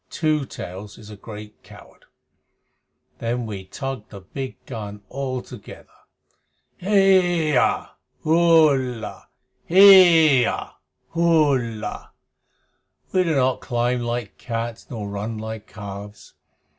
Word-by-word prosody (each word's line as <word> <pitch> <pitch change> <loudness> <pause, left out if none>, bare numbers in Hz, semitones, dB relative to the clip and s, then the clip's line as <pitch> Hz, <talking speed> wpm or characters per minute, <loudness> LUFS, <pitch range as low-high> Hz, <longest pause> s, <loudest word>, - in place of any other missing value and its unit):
Two 155 -3 0
Tails 95 +4 -9
is 105 -1 -13
a - - -9
great 105 0 -11
coward. - - -17 1.1
Then 120 +1 -2
we 100 -4 -7
tug 135 +2 -6
the 100 -2 -11
big 130 +8 -7
gun 105 -4 -7
all 130 -2 -4
together 120 -6 -13 0.9
Heya 180 -7 +2 0.3
Hullah! 155 -8 +2 0.4
Heeyah! 170 -8 +6 0.4
Hullah! 140 -11 0 1.0
We 185 - +3
do 165 -3 0
not 130 -1 +1
climb 120 +1 -1
like 120 -3 -4
cats 115 -1 -5
nor 110 -4 -5
run 105 +3 -5
like 110 -1 -7
calves. 100 +1 -10
125 Hz, 100 wpm, -22 LUFS, 105-155 Hz, 1.1 s, Heeyah